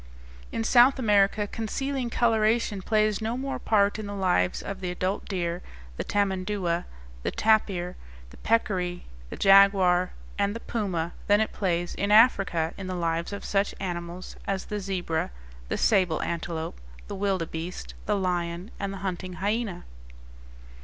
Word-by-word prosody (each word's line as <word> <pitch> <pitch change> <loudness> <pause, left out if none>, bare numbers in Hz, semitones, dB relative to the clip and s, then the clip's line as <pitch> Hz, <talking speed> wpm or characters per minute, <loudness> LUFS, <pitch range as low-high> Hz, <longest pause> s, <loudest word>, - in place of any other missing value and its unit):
In 115 - -2
South 245 - +6
America 210 -3 +3
concealing 250 +5 -3
coloration 225 -3 +2
plays 215 +1 +1
no 225 +2 -1
more 270 +1 -3
part 205 -1 +2
in 215 - -5
the 205 - -5
lives 180 - +1
of 195 -1 -5
the 185 -2 -3
adult 185 +2 -2
deer, 175 -3 -2 0.3
the - - -3
tamandua, 190 -3 0 0.4
the - - -1
tapir, 195 -5 +1 0.4
the - - -14
peccary, 185 -6 0 0.2
the - - -7
jaguar, 195 -2 +6 0.3
and 200 +1 +1
the - - -4
puma 185 -8 -2
than 205 0 +5
it 220 - 0
plays 175 -3 -1
in 200 - -2
Africa 195 -8 +4
in 190 - -5
the 185 - -3
lives 170 0 -1
of 200 - -6
such 200 0 0
animals 175 -1 -5
as 195 -1 -1
the 210 - -3
zebra, 185 -4 -2 0.4
the - - -1
sable 185 -7 +3
antelope, 165 - -4 0.3
the - - -5
wildebeeste, 180 -3 -3
the 210 - +2
lion, 175 +1 -2
and 200 -1 -2
the 195 - -6
hunting 185 0 -3
hyena. 200 0 -2
195 Hz, 150 wpm, -27 LUFS, 175-210 Hz, 0.4 s, South